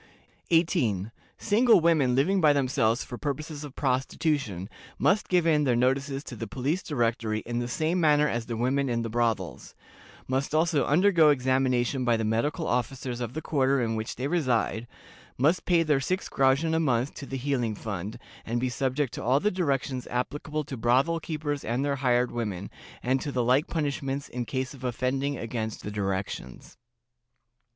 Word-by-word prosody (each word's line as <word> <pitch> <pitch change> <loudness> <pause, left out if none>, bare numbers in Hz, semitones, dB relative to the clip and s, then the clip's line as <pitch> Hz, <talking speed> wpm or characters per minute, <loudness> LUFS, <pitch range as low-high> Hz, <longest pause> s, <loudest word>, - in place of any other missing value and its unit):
"18. 125 - +2 0.3
Single 225 0 +4
women 155 -7 +3
living 185 +9 +2
by 150 -2 +6
themselves 125 -4 +1
for 120 - -8
purposes 150 +1 -4
of 145 -2 -9
prostitution 130 - -1 0.3
must 205 +2 +2
give 180 -2 +3
in 155 -2 +3
their 125 -4 +2
notices 135 +3 0
to 125 - -8
the 115 0 -5
Police 140 - -1
Directory 115 -5 -1
in 120 0 -3
the 120 - -2
same 160 +8 0
manner 150 -1 +4
as 115 -3 -2
the 115 - -3
women 130 +3 +1
in 115 -1 0
the 115 - -4
brothels; 115 -6 -2 0.5
must 135 +3 -1
also 160 -2 +2
undergo 165 0 +5
examination 130 -2 +1
by 120 -2 +2
the 110 - -2
medical 115 +7 0
officers 125 0 -2
of 120 0 -4
the 155 - -5
quarter 140 -2 +2
in 115 -2 0
which 110 0 -4
they 130 +3 -2
reside; 125 -7 0 0.5
must 155 +8 +2
pay 170 -2 +4
their 150 -3 +2
six 185 +8 -2
groschen 135 +5 +2
a 160 - +2
month 130 -3 +1
to 140 - -8
the 135 - -4
healing 125 -5 -1
fund, 100 -1 -5 0.3
and 120 +1 -2
be 130 +1 0
subject 130 +1 -1
to - - -5
all 130 +4 +3
the 210 +7 +1
directions 135 -7 -1
applicable 150 +5 -3
to 140 -2 -7
brothel 130 +8 +2
keepers 150 -3 -3
and 120 +5 -1
their 140 -1 0
hired 125 -2 +2
women, 105 -5 -4 0.3
and 130 +2 +1
to 145 - -3
the 125 -2 0
like 130 +8 +3
punishments 140 -3 -2
in 125 -1 -4
case 130 0 -3
of 130 -2 -13
offending 130 +3 -1
against 110 -2 -4
the 105 - -5
directions. 95 -10 -4
130 Hz, 175 wpm, -27 LUFS, 120-150 Hz, 0.5 s, by